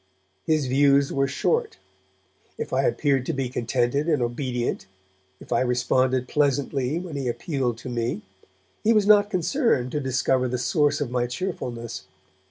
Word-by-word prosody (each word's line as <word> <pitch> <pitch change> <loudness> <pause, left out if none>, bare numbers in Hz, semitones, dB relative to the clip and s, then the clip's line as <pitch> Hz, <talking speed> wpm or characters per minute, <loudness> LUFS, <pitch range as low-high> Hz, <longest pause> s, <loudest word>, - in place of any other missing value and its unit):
His 155 -3 +2
views 140 +1 +3
were 135 0 +1
short; 450 - -1 0.8
if 460 - -5
I - - +2
appeared 140 - +1
to 165 - 0
be 135 -3 -2
contented 125 +5 0
and 150 -4 +2
obedient, 120 -2 -2 0.5
if - - -14
I - - +3
responded 130 +1 +1
pleasantly 140 0 0
when 175 -3 -6
he 135 -2 -3
appealed 125 -2 -2
to 120 - -10
me, 115 -3 -2 0.6
he 225 - +4
was 210 -2 +3
not 205 0 +5
concerned 185 - +1
to 150 - -1
discover 130 -1 +1
the 125 +1 -2
source 145 +4 +1
of 130 -4 -2
my 125 -1 0
cheerfulness. 125 - -5
135 Hz, 155 wpm, -24 LUFS, 125-155 Hz, 0.8 s, not